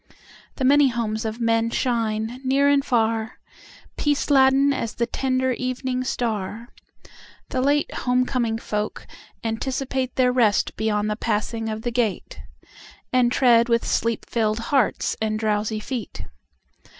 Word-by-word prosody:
The 265 - -1
many 285 +1 +6
homes 230 -2 -2
of 220 +1 -4
men 230 -1 +1
shine 230 0 -1
near 270 +2 +3
and 285 -1 +3
far, 225 -3 0 0.6
Peace 290 0 0
laden 270 +1 +5
as 230 -4 -4
the 235 - 0
tender 260 +1 0
evening 255 0 -2
star, 230 -2 -3 0.8
The 255 - -1
late 285 +2 +1
home 250 0 +1
coming 235 -4 -1
folk 210 -1 -4 0.4
anticipateTheir 255 +2 -1
rest 220 -5 +2
beyond 210 -1 0
the - - -1
passing 225 +1 -2
of 220 0 -5
the 240 - -2
gate, 230 -5 -2 0.7
And 250 -1 +3
tread 240 -2 +4
with 235 0 +2
sleep 230 0 -1
filled 215 -2 0 0.2
hearts 265 -6 +1
and 215 -1 0
drowsy 215 0 -1
feet. 215 - -6
235 Hz, 135 wpm, -23 LUFS, 220-260 Hz, 0.8 s, many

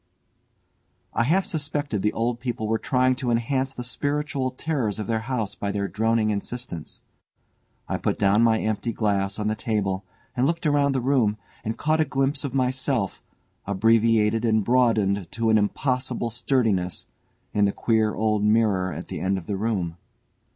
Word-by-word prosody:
I 120 - +2
half 185 +8 +2
suspected 145 - -2
the 105 - +2
old 120 +1 -1
people 120 -3 -3
were 110 0 +1
trying 130 0 +2
to 125 -2 -2
enhance 130 +3 0
the 125 - -6
spiritual 145 +1 -1
terrors 130 -6 -2
of 105 - -3
their 110 +1 0
house 110 -3 -2
by 100 - -3
their 100 0 -1
droning 110 0 +1
insistence. 105 -5 -5 0.9
I - - -2
put - - -1
down 100 +2 +3
my 115 -1 +4
empty 110 +2 -1
glass 100 -2 0
on 105 -1 -2
the 110 - +1
table 105 -3 -1 0.3
and 125 +1 +2
looked 165 +1 -1
about 145 -2 +3
the 130 - 0
room, 120 -5 +2 0.3
and 110 +1 -3
caught 155 +1 +2
a - - +3
glimpse 135 +1 0
of 140 -2 -4
myself, 130 -4 0 0.5
abbreviated 115 +2 +3
and 110 -2 +2
broadened 110 -7 +2
to 115 -1 +1
an 110 - +5
impossible 125 +2 -1
sturdiness, 110 -7 0 0.5
in 105 -1 +3
the 100 - +2
queer 110 0 +1
old 105 -1 +1
mirror 105 -4 +2
at 80 +3 -7
the - - -5
end 95 +1 0
of 90 - -7
the 100 - -2
room. 95 -5 -2
115 Hz, 170 wpm, -25 LUFS, 105-130 Hz, 0.9 s, an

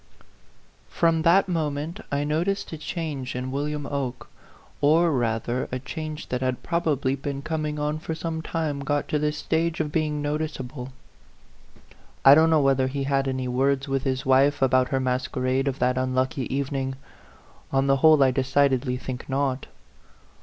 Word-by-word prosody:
FROM 165 -1 +2
that 180 +4 +4
moment 160 +1 -2
I 140 0 0
noticed 165 +6 -1
a - - -4
change 150 -6 -4
in 125 +1 -3
William 145 +1 -2
Oke; 135 -3 -4 0.5
or, 160 +4 +4
rather, 120 -1 -1
a 130 - -1
change 155 +3 -6
that 125 0 -2
had 130 -1 -1
probably 145 -6 0
been 140 0 -5
coming 155 -1 -2
on 150 +1 -1
for 160 +1 -4
some 160 0 -4
time 160 -3 -2
got 145 +1 -1
to 150 - +1
the 150 0 +1
stage 160 +2 -1
of 155 -2 -1
being 150 -1 0
noticeable. 145 -3 -4 1.3
I 135 - +11
don't 160 +2 +5
know 160 -2 +4
whether 135 -1 +3
he 135 +1 -3
had 135 0 0
any 130 -1 -2
words 135 +2 +1
with 135 -1 0
his 130 -2 -1
wife 135 +2 +4
about 130 -1 +3
her 135 - 0
masquerade 130 +1 -1
of 135 -1 -1
that 125 0 +1
unlucky 130 0 -1
evening. 135 -1 -2 0.8
On 135 0 +2
the 135 0 +3
whole, 155 0 +6
I 130 - +4
decided 135 0 +2
ly 125 0 -1
think 130 0 -7
not. 135 -1 -1
140 Hz, 165 wpm, -25 LUFS, 130-155 Hz, 1.3 s, I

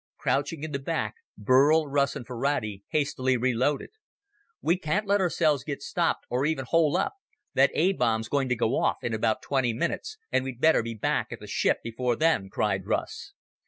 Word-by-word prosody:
Crouching 145 +2 -1
in 155 - -4
the 140 - -2
back, 160 +4 -2 0.2
Burl, 145 +5 +4
Russ, 140 -1 +1
and 135 -4 -6
Ferrati 115 -5 -2
hastily 130 -4 0
reloaded. 130 +4 0 0.7
"We 170 - +2
can't 190 +5 -1
let 200 0 +2
ourselves 155 -6 +2
get 140 -2 -5
stopped, 170 +2 -1
or 125 +2 -1
even 150 -3 0
hole 165 +3 +3
up. 190 - 0 0.4
That - - +5
A 190 +2 +3
bomb's 110 -7 0
going 140 -2 0
to 125 - +2
go 115 +2 +1
off - - +1
in 120 - -2
about 110 0 0
twenty 130 -4 0
minutes, 170 - -3
and - - +2
we'd 130 -2 -6
better 160 -1 +4
be 115 0 -5
back 110 - -1
at - - -6
the - - -10
ship - - +1
before 120 +1 -1
then," 155 -11 +1
cried 95 -1 -1
Russ. - - -3
135 Hz, 190 wpm, -27 LUFS, 120-155 Hz, 0.7 s, That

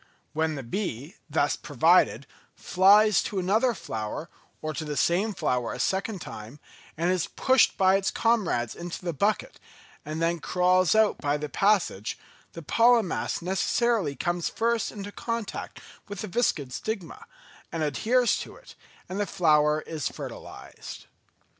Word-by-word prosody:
When 160 0 0
the 135 - -6
bee, 145 - -4 0.2
thus - - +1
provided, - - +3 0.3
flies 205 +3 +5
to 200 - -4
another 220 +7 +2
flower, 110 +9 -5 0.3
or 155 0 -4
to 160 - -4
the 150 -2 -4
same 195 +6 +2
flower 125 -8 -1
a - - -7
second 195 0 -1
time, 110 +7 -9 0.4
and 170 +3 +1
is 185 -3 0
pushed 260 0 +3
by 190 0 +4
its 195 - -1
comrades 195 - 0
into 175 +1 -7
the 170 - -1
bucket 210 - -1 0.4
and 155 +1 -5
then 165 +1 0
crawls 180 +3 +2
out 220 -1 +3
by 145 0 0
the 150 0 -5
passage, 195 - +1 0.4
the 165 - -9
pollen 230 +2 +4
mass - - -3
necessarily 190 -2 +1
comes 175 +4 -1
first 230 0 0
into 205 -1 -7
contact 230 -1 -5 0.3
with 205 0 -6
the 215 - -4
viscid 170 - 0
stigma, 220 - -5 0.5
and 165 -1 -2
adheres 235 - +2
to - - -8
it, - - -15 0.3
and 190 +2 -5
the 205 - 0
flower 155 -4 +3
is 155 -4 -4
fertilised. - - -9
180 Hz, 150 wpm, -26 LUFS, 155-215 Hz, 0.5 s, flies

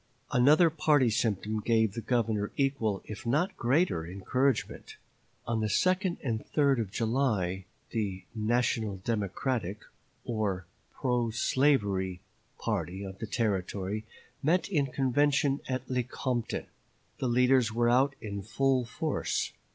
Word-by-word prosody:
Another 150 +7 +5
party 150 -6 +3
symptom 110 -1 0
gave 110 -2 +2
the 115 - -4
Governor 110 -4 0
equal, 115 -8 0
if 105 +3 -8
not 150 +10 +1
greater, 130 - +1
encouragement. 105 +9 -1 0.5
On 115 -1 -1
the 110 - 0
2d 185 - +1
and 115 -5 -2
3d 140 -4 +2
of 105 - -4
July 110 -5 0 0.3
the 100 -5 -2
"National 110 -2 0
Democratic" 105 0 -2 0.4
or 105 -6 -1 0.3
pro 125 -3 0
slavery 105 -7 +1 0.4
party 95 +3 -2
of 95 -1 -8
the 110 - -4
Territory 105 -2 -1 0.4
met 165 +5 +2
in 145 -8 +1
convention 140 +2 +2
at 130 0 -2
Lecompton. 125 -1 -2 0.5
The 130 - 0
leaders 125 -1 +4
were 120 +1 +2
out 135 +3 +3
in 100 -3 -5
full 130 +4 +1
force. 150 +6 -2
120 Hz, 120 wpm, -30 LUFS, 105-135 Hz, 0.5 s, Another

